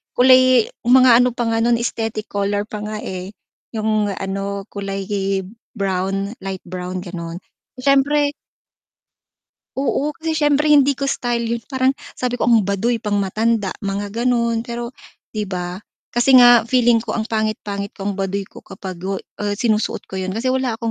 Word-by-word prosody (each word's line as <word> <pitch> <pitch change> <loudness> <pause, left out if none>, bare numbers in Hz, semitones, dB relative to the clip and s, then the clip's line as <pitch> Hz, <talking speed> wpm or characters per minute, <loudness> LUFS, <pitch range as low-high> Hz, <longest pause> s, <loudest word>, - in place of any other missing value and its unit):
kulay 255 -2 +5 0.2
mga 250 -1 +7
ano 250 -1 +2
pa 245 - -1
nga 225 - +1
nun 235 +1 +3
aesthetic 225 -2 -3
color 205 0 0
pa 210 0 -7
nga, 210 +1 -4
eh, 185 +2 -6 0.4
yung 215 -1 +1
ano 195 +1 -4
kulay 195 -1 -4
hib 195 -1 -2 0.3
brown, 195 0 -1
light 190 -1 -6
brown 180 0 -5
gano'n. 170 -2 -6 0.4
Siyempre 280 +3 +3 1.5
Oo, 280 +2 0
kasi 320 0 -2
siyempre 295 -1 +2
hindi 285 -2 +5
ko 275 - -1
style 240 -3 -1
yun. 230 0 -2
Parang 260 0 +2 0.2
sabi 250 -1 -1
ko 245 - -3
ang 225 -5 +4
baduy 215 +4 0
pang 210 -2 -2
matanda 215 +1 0
mga 200 0 -3
gano'n, 235 0 0
pero 235 0 -4 0.4
'di 215 -1 -3
ba? 180 -1 -4 0.3
Kasi 240 +3 +3
nga 245 -2 +8
feeling 240 -1 +4
ko 225 -1 -4
ang 225 - 0
pangit-pangit 215 -2 -2
ko - - -9
ang 200 - -6
baduy 195 +1 -1
ko 195 - -13
kapag 185 -3 -8
go 190 +3 -3 0.2
ah, 205 -1 -1
sinusuot 215 0 0
ko 190 - -4
yun 185 0 -3
kasi 240 +4 0
wala 260 -2 0
akong 230 0 -3
220 Hz, 165 wpm, -20 LUFS, 195-245 Hz, 1.5 s, nga